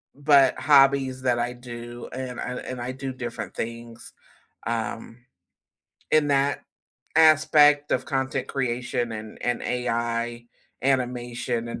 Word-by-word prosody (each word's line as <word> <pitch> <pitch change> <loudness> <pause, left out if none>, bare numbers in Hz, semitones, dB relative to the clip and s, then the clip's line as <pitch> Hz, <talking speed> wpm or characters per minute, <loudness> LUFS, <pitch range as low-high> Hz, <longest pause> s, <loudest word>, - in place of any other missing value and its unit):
but 140 -2 +4
hobbies 135 -1 +4
that 125 -2 +2
I 120 +1 -1
do 120 -1 -9
and 130 -1 -5
I - - -4
and 130 -1 -6
I 120 +1 -3
do 135 +1 -5
different 120 -2 -6
things, 115 0 -7 0.5
um, 115 0 -4 0.9
in 150 -2 +3
that 140 0 +1 0.6
aspect 150 -2 +5
of 130 - +1
content 135 -2 -2
creation 125 -2 -2
and 110 0 -8
and 120 0 -1
AI 120 -1 -2 0.4
animation 120 -2 -1
and 115 - -6
125 Hz, 120 wpm, -25 LUFS, 120-135 Hz, 0.9 s, aspect